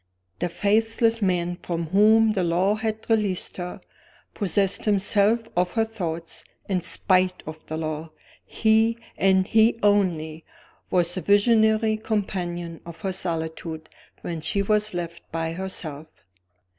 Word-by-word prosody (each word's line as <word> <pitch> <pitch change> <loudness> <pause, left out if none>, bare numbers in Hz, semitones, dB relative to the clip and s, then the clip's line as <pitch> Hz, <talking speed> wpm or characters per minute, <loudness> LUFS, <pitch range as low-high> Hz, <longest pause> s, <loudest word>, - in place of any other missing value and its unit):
The 175 - -1
faithless 225 +4 +1
man 175 -2 0
from 170 -2 -3
whom 215 +4 +5
the 195 -4 0
law 175 +4 +2
had 220 0 -3
released 210 -5 0
her, 180 -1 -5 0.5
possessed 195 -1 0
himself 210 +2 +2
of 180 0 +1
her 225 -1 +2
thoughts, 170 -7 -5 0.2
in 185 -3 0
spite 185 +1 +1
of 155 0 -8
the 160 - -4
law. 155 0 -4 0.3
He, 220 +1 +2 0.2
and 190 -1 +3
he 220 +3 +4
only, 170 -6 +1 0.5
was 175 -1 +1
the 185 - -3
visionary 220 +3 +3
companion 175 -6 -3
of 170 -1 -11
her 190 -2 -2
solitude 160 -2 -4 0.3
when 165 -2 -5
she 200 +5 0
was 210 -1 +1
left 170 -1 -5
by 165 0 -2
herself. 165 -5 -5
190 Hz, 130 wpm, -24 LUFS, 170-215 Hz, 0.5 s, whom